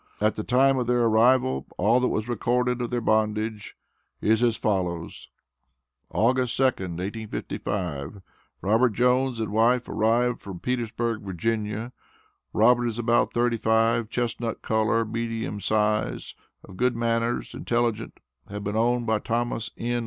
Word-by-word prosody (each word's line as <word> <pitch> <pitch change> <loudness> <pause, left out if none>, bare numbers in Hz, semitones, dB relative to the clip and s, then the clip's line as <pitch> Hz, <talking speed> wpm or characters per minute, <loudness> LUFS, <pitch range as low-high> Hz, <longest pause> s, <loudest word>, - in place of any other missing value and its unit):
At 105 +1 +2
the 110 - -5
time 130 +2 +3
of 125 - -2
their 125 0 +2
arrival 110 - +3
all 110 +7 +3
that 125 - +1
was 110 -1 -2
recorded 125 +1 0
of 120 - -2
their 120 -1 -1
bondage 110 -1 -1 0.4
is 110 +2 +2
as 120 -2 +2
follows 90 -5 -2 0.8
August 120 +5 +1
2d, - - +4 0.3
1855, 95 -5 -4 0.4
Robert 110 +3 +3
Jones 125 +1 +2
and 110 -3 -2
wife, 120 +3 +2
arrived 120 +3 +1
from 95 -3 -8
Petersburg, 120 -1 -2
Va. 105 +4 -3 0.6
Robert 120 +2 +4
is 115 -1 -3
about 120 0 +2
thirty 120 0 +1
five, 115 +1 +2
chestnut 120 -1 -3
color, 110 +1 +1
medium 115 -1 -3
size, 105 - 0 0.3
of 95 -2 -13
good 125 0 +1
manners, 115 +1 -1
intelligent, 115 -2 -2 0.3
had 105 0 -6
been 105 +1 -3
owned 120 +2 +1
by 110 -1 +1
Thomas 115 0 -2
N. 120 +1 -1
115 Hz, 140 wpm, -25 LUFS, 105-120 Hz, 0.8 s, 2d